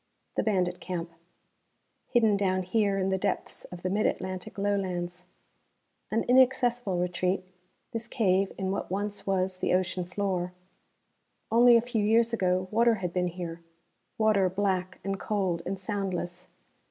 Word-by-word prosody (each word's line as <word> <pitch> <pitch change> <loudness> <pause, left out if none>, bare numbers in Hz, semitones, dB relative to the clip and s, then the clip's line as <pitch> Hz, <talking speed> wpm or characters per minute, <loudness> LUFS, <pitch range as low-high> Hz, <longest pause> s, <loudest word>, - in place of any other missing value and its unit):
The - - +2
bandit 180 -4 0
camp. 170 -2 -4 1.0
Hidden 225 -4 +3
down 185 -2 +1
here 200 +1 +1
in 190 0 0
the 190 0 0
depths - - -2
of 180 -1 -10
the 185 - 0
Mid 210 +2 +2
Atlantic 185 +1 -4
Lowlands. 180 -3 -2 0.8
An 225 +1 +1
inaccessible 245 -5 +3
retreat, 180 +1 0 0.5
this 230 0 -4
cave 195 -5 +2
in 190 -1 -1
what 195 - -3
once 205 +2 -3
was 190 -1 0
the 180 - +1
ocean 185 0 0
floor. 180 -1 -2 1.0
Only 240 +1 +7
a - - +3
few 235 -3 -1
years 230 +2 +3
ago 185 -3 +1
water 230 +1 +4
had 180 -4 -4
been 180 -1 +1
here, 170 -1 -6 0.6
water 215 -4 +3
black 185 -1 -1
and 195 0 -2
cold 190 -5 -1
and 195 +1 -2
soundless. 185 -3 -3
190 Hz, 145 wpm, -28 LUFS, 180-215 Hz, 1.0 s, Only